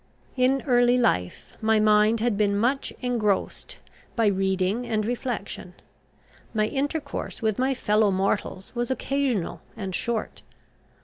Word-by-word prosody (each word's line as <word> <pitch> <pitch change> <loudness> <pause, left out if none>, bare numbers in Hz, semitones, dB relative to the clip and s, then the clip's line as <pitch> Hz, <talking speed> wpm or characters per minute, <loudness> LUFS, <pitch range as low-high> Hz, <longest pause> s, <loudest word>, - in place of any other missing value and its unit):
In 260 +1 +2
early 245 -2 +4
life 90 - 0
my 220 0 +3
mind 215 +1 +4
had 235 -2 +1
been 200 -1 +2
much 250 +6 0
engrossed 225 -5 -1 0.4
by 230 - +2
reading 190 +2 +1
and 220 -3 -1
reflection: 225 -6 -4 0.8
my 215 0 +3
intercourse 285 +2 -3
with 215 0 +1
my 265 +1 +2
fellow 210 -3 +2
mortals 190 0 -1
was 240 -1 -2
occasional 260 -7 -1 0.2
and 190 -2 -4
short. 230 +3 -2
220 Hz, 125 wpm, -25 LUFS, 205-250 Hz, 0.8 s, early